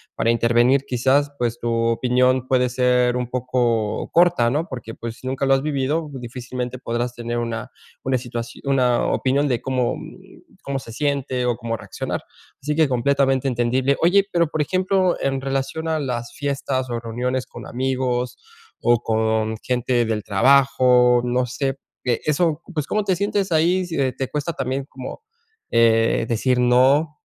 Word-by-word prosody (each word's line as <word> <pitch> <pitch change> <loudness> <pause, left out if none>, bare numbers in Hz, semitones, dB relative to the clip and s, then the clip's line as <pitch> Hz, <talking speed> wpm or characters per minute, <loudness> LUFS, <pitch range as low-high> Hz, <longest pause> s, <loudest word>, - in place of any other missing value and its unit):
para 115 - 0
intervenir 120 +3 +3
quizás, 135 +3 +2
pues, 120 -1 -1
tu 120 - -3
opinión 125 +2 +2
puede 125 -1 +3
ser 125 0 +2
un 125 -1 -2
poco 120 -4 -1
corta, 170 -9 +4
¿no? 155 +7 -1
Porque, 115 -3 -7
pues, 115 +2 -8
nunca 130 +1 -2
lo 135 - +4
has 135 - +2
vivido, 150 +2 -1
difícilmente, 125 0 -6
podrás 120 0 -2
tener 120 0 -4
una 115 -2 -4 0.3
una 130 -1 +1
situación 120 -1 -6
una 130 -3 +2
opinión 140 +2 +1
de 125 -4 0
cómo 125 -2 0 0.7
cómo 135 -1 -3
se 115 - -11
siente 140 -1 -1
o 120 -1 +1
cómo 115 -1 -3
reaccionar, - - -5 0.4
así 150 +2 -2
que 160 -2 +4
completamente 135 +1 +1
entendible, 130 +2 +1
oye, 195 +4 +4
pero, 170 -1 +2
por 155 0 -2
ejemplo, 185 +3 +1
en 135 -1 -1
relación 135 +4 -2
a 160 -1 0
las 120 -4 -4
fiestas 140 -2 -2
o 120 -1 -2
reuniones 125 +3 -2
con - - -10
amigos, 125 -1 -1 0.4
o 120 -1 +3
con 110 0 0
gente 125 -1 0
del 110 -2 -2
trabajo, 125 +2 +4
no 125 +1 +1
sé, 135 +2 -2 0.3
eh 120 -2 0
eso, 155 0 +1
pues, 150 -3 -2
¿cómo 215 0 0
te 190 -2 +1
sientes 200 -1 -1
ahí, 175 +3 +2
si 165 -2 -5 0.2
te 135 - -3
cuesta 150 +3 -3
también 135 -1 -3
como, 130 - -9 0.5
eh, 115 -1 +3
decir 125 +2 +1
no, 135 +5 +3
130 Hz, 160 wpm, -22 LUFS, 120-140 Hz, 0.7 s, corta